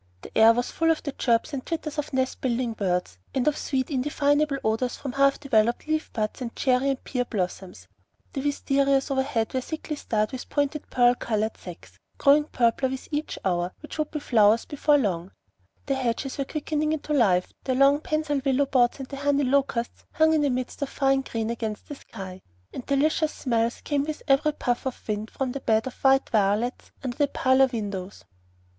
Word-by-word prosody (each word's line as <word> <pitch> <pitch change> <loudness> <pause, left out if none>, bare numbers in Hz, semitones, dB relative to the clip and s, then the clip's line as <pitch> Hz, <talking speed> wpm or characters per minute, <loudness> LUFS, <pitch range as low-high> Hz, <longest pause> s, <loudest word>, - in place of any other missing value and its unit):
The - - -12
air 220 +1 +8
was 245 +1 -2
full 325 0 +1
of 325 - +1
the 285 - -3
chirps 235 +1 0
and 265 -2 -3
twitters 310 -2 -4
of 295 - -4
nest 260 -1 -1
building 245 -2 0
birds, 180 - -2 0.2
and 265 +1 +1
of 300 - +3
sweet 260 0 -2
indefinable 290 +1 +1
odors 225 +3 0
from 275 - -5
half 275 +1 +3
developed 235 -4 +1
leaf 310 0 -1
buds 215 +3 -3
and 235 -2 -5
cherry 260 +1 +2
and 270 -1 -2
pear 250 -2 -1
blossoms. 185 - -4 0.5
The 270 - -2
wisterias 275 -1 +1
overhead 265 -5 0
were 260 - 0
thickly 310 +2 -5
starred 215 -6 -1
with 260 - -7
pointed 290 +1 -1
pearl 245 -1 +4
colored 220 -2 -2
sacs, 175 -2 -12 0.2
growing 295 +1 +5
purpler 250 -1 +1
with 265 0 -6
each 300 +1 -3
hour, 175 -1 0
which 305 +1 -9
would 305 - 0
be 305 - -4
flowers 225 -4 +4
before 295 0 +2
long; 190 -7 -2 0.5
the 275 - 0
hedges 260 +1 -2
were 275 - 0
quickening 305 +1 -1
into 300 -1 -3
life, 190 -10 +2
the 260 - 0
long 275 +2 +5
pensile 310 -2 -1
willow 275 0 +2
boughs 250 -3 +2
and 265 - -6
the 275 - -6
honey 285 0 +1
locusts 260 -3 0
hung 315 0 +4
in 310 -2 +2
a 285 - +2
mist 255 +2 -3
of 280 - -1
fine 270 -1 +2
green 230 -3 -3
against 220 -2 -4
the - - -6
sky, 190 -8 -9 0.3
and 250 - -6
delicious 305 +2 +2
smells 235 -2 -1
came 285 -2 0
with 310 0 -5
every 295 +2 +3
puff 245 -2 -1
of 260 - -7
wind 215 0 -2
from 265 -2 -3
the 275 - -4
bed 220 -2 +2
of 260 - -5
white 270 0 +4
violets 215 +3 0
under 255 -2 -4
the 290 - +3
parlor 265 -1 +3
windows. 200 -5 -5
265 Hz, 195 wpm, -25 LUFS, 230-285 Hz, 0.5 s, air